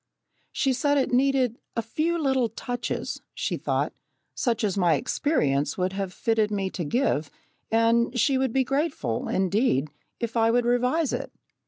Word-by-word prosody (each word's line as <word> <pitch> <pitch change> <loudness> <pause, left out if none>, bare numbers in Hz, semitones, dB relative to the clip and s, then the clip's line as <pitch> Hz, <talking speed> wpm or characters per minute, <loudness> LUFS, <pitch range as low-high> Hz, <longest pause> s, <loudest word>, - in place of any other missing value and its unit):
She 270 -2 +1
said 285 +4 +1
it 270 - +1
needed 260 -2 +2 0.2
"a 230 - -1
few 320 +9 -1
little 265 -6 +1
touches," 245 +2 -4
she - - -1
thought, - - -1 0.4
such 235 -2 -1
as 200 -3 +1
my 175 -4 +3
experience 150 - 0
would 185 0 0
have 195 -1 -3
fitted 220 +2 +1
me 195 -2 -2
to 175 - -4
give, 155 - 0 0.4
and 230 +2 +2
she 265 +3 +3
would 265 -2 +1
be 265 +2 +2
grateful, 275 - -1
indeed, 190 - +1 0.3
if 235 -1 -3
I 225 -1 +4
would 240 +1 +2
revise 250 +6 +1
it. - - -3
235 Hz, 160 wpm, -26 LUFS, 195-265 Hz, 0.4 s, I